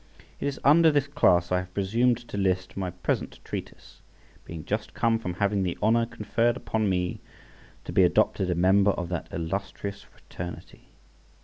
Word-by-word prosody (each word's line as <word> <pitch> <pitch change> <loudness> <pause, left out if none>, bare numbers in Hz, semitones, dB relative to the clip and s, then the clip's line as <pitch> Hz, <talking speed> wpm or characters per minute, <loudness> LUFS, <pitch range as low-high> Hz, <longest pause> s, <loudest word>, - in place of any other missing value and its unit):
It - - -2
is 140 - -3
under 160 +3 +6
this 145 -2 +2
class 90 -11 +3
I 90 - +3
have 90 0 -9
presumed 115 +5 +2
to - - -6
list 95 -2 0
my 95 -2 -2
present 90 0 -3
treatise, - - -8 0.4
being 80 -2 -8
just - - -3
come 115 -1 +2
from 90 -5 -4
having 100 0 +1
the 90 -2 -2
honour 115 +2 +3
conferred 120 0 0
upon 110 -4 -1
me 90 -1 -1 0.7
to - - -6
be - - +5
adopted 95 - +2
a 90 - +1
member 95 +3 +4
of 90 -1 -4
that 90 -4 -3
illustrious 100 +4 -4
fraternity. 90 0 -10
100 Hz, 170 wpm, -27 LUFS, 90-115 Hz, 0.7 s, under